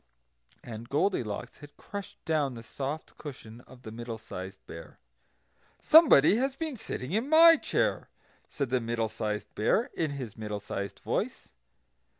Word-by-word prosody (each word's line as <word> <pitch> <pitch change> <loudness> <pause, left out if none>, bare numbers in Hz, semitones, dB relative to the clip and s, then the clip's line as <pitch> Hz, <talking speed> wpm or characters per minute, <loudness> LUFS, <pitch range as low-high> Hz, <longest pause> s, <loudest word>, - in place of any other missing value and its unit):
And 115 0 -8
Goldilocks 140 - -1
had 145 0 -14
crushed 200 -1 -8
down 150 -5 0
the 115 - -9
soft 140 +6 -6
cushion 120 -5 -9
of 125 -1 -16
the 110 - -8
Middle 115 0 -6
sized 95 -3 -9
Bear. - - -11 0.8
"SOMEBODY 255 - +7
HAS 265 +2 0
BEEN 315 -2 -4
SITTING 130 - -6
IN 225 +8 0
MY 330 +1 +8
CHAIR!" - - -1 0.4
said 140 -4 -3
the 130 -1 +2
Middle 115 -1 -1
sized 105 -1 -4
Bear, 210 - +1
in 160 - -1
his 130 -7 -6
middle 105 -1 -4
sized 100 0 -5
voice. - - -3
130 Hz, 150 wpm, -29 LUFS, -, 0.8 s, MY